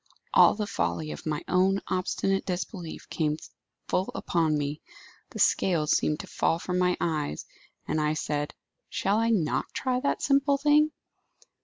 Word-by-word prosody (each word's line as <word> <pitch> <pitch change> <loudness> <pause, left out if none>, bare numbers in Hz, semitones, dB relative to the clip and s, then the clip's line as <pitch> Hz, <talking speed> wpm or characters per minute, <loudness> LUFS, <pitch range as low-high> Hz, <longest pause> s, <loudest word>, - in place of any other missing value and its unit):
All - - +7
the 210 0 -2
folly 85 - -2
of 75 - -7
my 150 -1 -2
own 190 +2 +3
obstinate 195 +1 0
disbelief 180 -1 -5
came 150 -2 0 0.5
full 185 - 0
upon 160 -3 +1
me; 145 +1 -3 0.5
the - - -9
scales 160 -5 +3
seemed 150 - 0
to - - -10
fall 165 - +1
from 180 +1 -2
my 180 0 +2
eyes, 150 - -2 0.4
and 155 - 0
I 150 0 +1
said, 150 -1 -2 0.3
'Shall 200 +3 +1
I 230 0 +2
not 185 -9 0
try 255 -1 0
that 280 - -1
simple 280 0 +3
thing? 300 +2 +4
180 Hz, 155 wpm, -27 LUFS, 150-205 Hz, 0.5 s, All